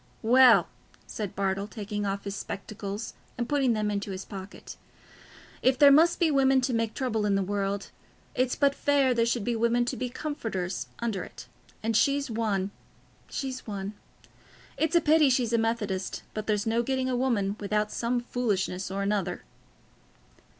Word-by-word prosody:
"Well," 250 +1 +6 0.4
said 210 -4 -5
Bartle, 195 +1 -1
taking 210 -1 -4
off 200 0 -3
his 200 -1 -4
spectacles 200 +2 -6 0.2
and 240 0 -2
putting 270 -4 +2
them 210 -1 0
into 200 0 -3
his 190 0 -5
pocket, 195 0 -9 0.9
"if 260 0 +3
there 285 0 +8
must 325 +4 +5
be 335 -3 +3
women 270 -1 +4
to 250 0 -1
make 230 -1 -1
trouble 240 -5 -1
in 205 -1 +2
the 195 - +1
world, 200 0 -2 0.4
it's 255 0 +1
but 280 -1 +3
fair 280 -3 +2
there 230 -1 +2
should 235 -2 0
be 240 +2 -1
women 235 +1 +2
to - - -2
be 255 -1 -3
comforters 225 - -4
under 220 -6 -2
it; - - -11 0.4
and 225 0 0
she's 280 +3 +2
one—she's 225 +5 -5
one. 200 -1 -4 0.8
It's 320 +2 0
a 340 - +6
pity 305 -1 +5
she's 245 -3 +1
a 230 - +4
Methodist; 210 -4 -2
but 215 -1 -5
there's 210 0 +1
no 225 +1 +2
getting 260 +1 -1
a 255 - 0
woman 225 -6 0
without 210 +1 -1
some 240 +1 -1
foolishness 200 -7 -1
or 195 +1 -2
other." 200 -4 -2
225 Hz, 165 wpm, -28 LUFS, 200-255 Hz, 0.9 s, there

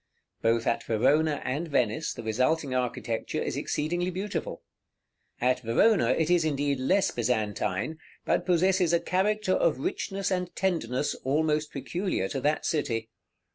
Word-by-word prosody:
Both 115 0 +2
at - - +1
Verona 145 +7 +2
and 145 +7 -2
Venice 120 -7 0
the 115 - -7
resulting 130 +6 0
architecture 125 -2 -2
is - - -2
exceedingly 175 +4 -1
beautiful. 190 +3 -4 0.8
At 125 +1 +2
Verona 120 - +3
it 155 +5 +2
is, 175 -2 +4
indeed, 145 -3 0
less 190 +10 +2
Byzantine, 110 +3 -1 0.3
but - - +1
possesses 180 0 +3
a 170 - +4
character 195 +2 +1
of 165 -7 +2
richness 195 +8 -2
and 180 -1 -2
tenderness 150 -8 0
almost 150 +2 +1
peculiar 150 - -2
to 135 - -3
that 150 +3 0
city. 115 -7 -1
150 Hz, 135 wpm, -28 LUFS, 125-175 Hz, 0.8 s, is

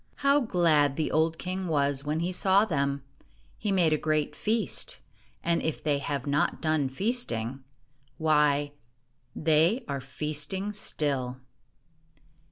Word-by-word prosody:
How 280 +1 +6
glad 165 - +2
the 155 - -1
old 160 +1 +2
king 185 +1 -4
was 140 -3 +1
when 150 +2 -1
he 175 +2 -1
saw 190 +3 +3
them! 140 -6 -1 0.6
He 210 - -1
made 175 -5 +3
a 155 - +1
great 155 -1 0
feast; 215 +3 0 0.4
and 170 0 +1
if 160 - -3
they 145 -2 +1
have 140 -1 -3
not 145 +1 +1
done 155 -4 +1
feasting 135 - -2 0.3
— 135 -1 -39
why, 150 -2 +2 0.6
they 165 - +2
are 140 -1 -3
feasting 150 +9 -3
still. 135 -10 -2
155 Hz, 135 wpm, -28 LUFS, 140-180 Hz, 0.6 s, How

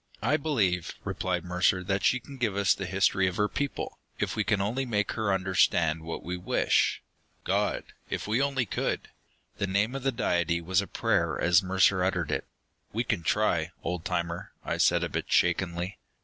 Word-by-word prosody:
"I 130 +6 +3
believe," 105 - 0
replied 90 -2 -2
Mercer, 90 +1 +2
"that 100 +1 -1
she 125 - +3
can 140 +2 -11
give 115 -6 0
us 100 -1 +4
the 100 - -5
history 95 0 +2
of 90 - -2
her 105 - +3
people, 140 +5 -4 0.2
if - - -2
we 110 - +1
can 105 -1 +1
only 110 +7 0
make 105 -5 0
her 110 -3 -1
understand 90 -4 +2
what 80 +1 -6
we 90 +1 -3
wish. 90 - +1 0.4
God! - - 0 0.3
If - - -3
we 110 +5 +2
only 135 -3 +1
could!" - - -2 0.5
The 100 - 0
name 100 +5 +1
of 135 - -4
the 135 +1 +1
Deity 85 -8 +1
was 90 +3 +1
a 100 - -6
prayer - - 0
as 85 +1 +5
Mercer 95 0 +3
uttered 90 -4 0
it. - - -2 0.4
"We 115 +3 0
can 110 -6 -1
try, 85 -2 +1
old 90 -2 -3
timer," 85 -1 -3
I - - -1
said, - - +3
a - - 0
bit - - -4
shakenly. 90 +1 +1
95 Hz, 190 wpm, -28 LUFS, 90-110 Hz, 0.5 s, as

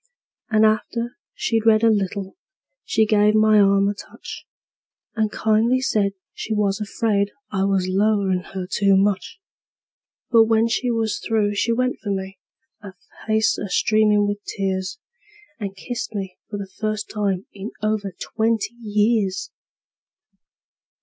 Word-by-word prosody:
And 220 -1 +4
after 230 +3 0 0.2
she'd 225 - 0
read 215 0 +5
a 225 - +6
little 195 -1 -2 0.5
she 220 - +2
give 210 0 +3
my 215 0 +5
arm 200 0 +4
a 205 - 0
touch, 200 - -10 0.7
And 215 -2 0
kindly 220 +4 +2
said 210 -6 +1 0.2
she 220 - -4
was 200 -1 +1
afraid 205 -1 0 0.2
I 195 -2 0
was 195 -2 +1
'lowin' 195 -1 +2 0.2
her 185 -1 -3
too 195 +1 +2
much; 200 - 0 0.9
But 230 -2 +7
when 225 0 +3
she 245 +2 0
was 225 -2 0
through 215 -2 0
she 215 +3 0
went 255 +2 0
for 205 - -6
me, 190 0 -4 0.4
her 195 -3 -11 0.3
face 220 0 +2
a 205 - -4
streamin' 210 0 +3
with 205 0 -3
tears, 190 +1 -3 0.6
And 200 -2 -5
kissed 235 +2 -5
me 190 -2 -5
for 205 - -4
the 195 -1 -7
first 215 -1 -2
time 200 -3 -2
in 200 +2 -6
over 215 -2 -1
twenty 225 0 -1
years! 210 -3 0
210 Hz, 145 wpm, -22 LUFS, 200-220 Hz, 0.9 s, But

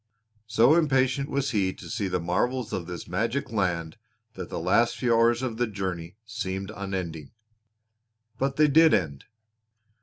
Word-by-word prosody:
So 115 +5 +5
impatient 135 -4 +2
was 140 -1 -1
he 100 -5 +1
to - - -12
see 100 -4 -2
the 90 - -1
marvels 110 +8 -1
of 85 -2 -3
this 90 -2 -7
magic 115 +10 -2
land 90 -6 -1 0.4
that 90 -2 -7
the - - -5
last 95 +8 +2
few 120 -2 +1
hours 115 +2 +3
of 120 -4 -3
the 120 0 +1
journey 95 -5 -5
seemed 95 -4 -4
unending. 90 -6 -5 1.1
But 135 0 0
they 150 +1 +5
did 160 +2 +6
end. 70 -8 -3
110 Hz, 155 wpm, -26 LUFS, 90-130 Hz, 1.1 s, did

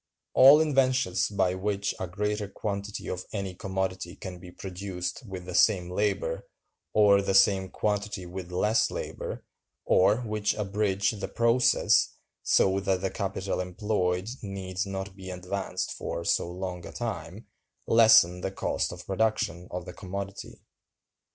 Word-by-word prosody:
All 140 +3 +9
inventions 130 - +2
by 95 -3 +1
which 100 +2 -1
a 95 - -3
greater 105 +3 -2
quantity 100 +1 -5
of 90 0 -4
any 100 -3 -3
commodity 95 -1 -3
can 90 -2 -8
be 90 0 -11
produced 90 0 -5
with 95 -2 -7
the 90 - -6
same 90 -3 +3
labor, 100 0 -1 0.4
or 100 -2 +5
the 100 -1 0
same 95 -1 +4
quantity 105 -2 -2
with 90 0 -7
less 105 +5 +2
labor, - - -6 0.4
or 105 +6 +4
which 105 -3 -1
abridge 100 -1 0
the 110 -2 -5
process, 115 +1 +3 0.3
so 95 0 +3
that 95 -2 0
the 95 - -1
capital 95 -1 -3
employed 90 0 -1
needs 95 -1 -4
not 95 0 -5
be 95 -1 -9
advanced 90 +2 -3
for 85 - -5
so 85 - +1
long 90 -1 -5
a - - -9
time, 110 -4 -5 0.4
lessen 110 -6 +6
the 95 - -1
cost 95 - -2
of - - -9
production 95 -4 -1
of 90 -1 -5
the 90 - -8
commodity. 100 +1 -7
95 Hz, 145 wpm, -28 LUFS, 90-105 Hz, 0.4 s, All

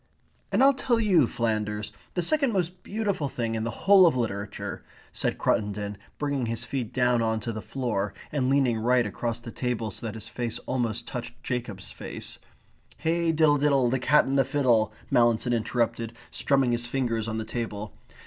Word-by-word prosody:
"And - - +4
I'll 275 +1 +7
tell 250 -3 +1
you, 185 - +4
Flanders, 105 -2 -1 0.2
the 175 - +1
second 275 - +2
most 180 -1 -1
beautiful 200 -9 -2
thing 115 -3 -2
in 110 -1 -1
the 115 - -1 0.2
whole 195 -2 +8
of 155 - +2
literature," 100 -3 -3 0.3
said - - -1
Cruttendon, 105 0 0 0.2
bringing 145 -4 -1
his 115 +1 -2
feet 120 -2 -3
down 125 -1 +2
on 110 -1 +1
to 115 - -3
the 110 -1 -5
floor, 110 -7 -2 0.2
and 130 -4 0
leaning 135 -5 +3
right 125 +1 +3
across 115 +3 -3
the 120 0 -9
table, 120 -3 -2
so 115 - -5
that 110 - -5
his 110 0 -8
face 120 -1 -3
almost 115 -2 -1
touched 120 +1 -7
Jacob's 115 -6 -3
face. - - -6 0.6
"'Hey 165 +1 +1
diddle 155 -2 +4
diddle, 135 -4 +3
the 130 - +1
cat 145 +4 +4
and 135 +1 +1
the - - +6
fiddle,'" 125 -5 +2 0.2
Mallinson 120 0 +3
interrupted, 115 0 -1 0.2
strumming 135 -3 +2
his 120 0 0
fingers 120 -4 -1
on 110 0 -2
the 110 - -3
table. 105 -3 -4
120 Hz, 180 wpm, -27 LUFS, 110-140 Hz, 0.6 s, whole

